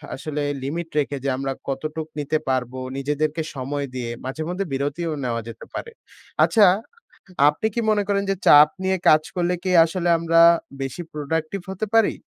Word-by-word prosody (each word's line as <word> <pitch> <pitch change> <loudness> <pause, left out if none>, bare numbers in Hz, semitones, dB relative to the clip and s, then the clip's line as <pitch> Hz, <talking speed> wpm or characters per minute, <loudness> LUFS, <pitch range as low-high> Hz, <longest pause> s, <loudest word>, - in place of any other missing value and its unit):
আসলে 150 +2 -4 0.2
লিমিট 165 +5 -4
রেখে 145 -1 -1
যে, 140 - 0
আমরা 135 0 -2 0.2
কতটুকু 155 +3 -4
নিতে 150 +2 0
পারবো, 130 0 -1 0.2
নিজেদেরকে 150 +3 -1
সময় 140 +2 -3
দিয়ে? 120 -2 -3
মাঝেমধ্যে 160 +8 -3
বিরতিও 145 +5 -2
নেওয়া 115 -2 -2
যেতে 115 -1 -9
পারে। 465 - -6 0.5
আচ্ছা 215 -3 +5 0.8
আপনি 150 +8 -1
কি 235 - 0
মনে 210 -1 +2
করেন 200 -1 +1
যে, - - +2
চাপ 150 +1 +9
নিয়ে 190 0 +1
কাজ 155 0 +6
করলে 180 0 +1
কি 185 - 0
আসলে 175 +1 -2
আমরা, 165 0 +3 0.4
বেশি 135 +6 -4
প্রোডাক্টিভ 155 +5 -3
হতে 190 +3 -3
পারি? 225 -2 +4
155 Hz, 160 wpm, -23 LUFS, 140-175 Hz, 0.8 s, চাপ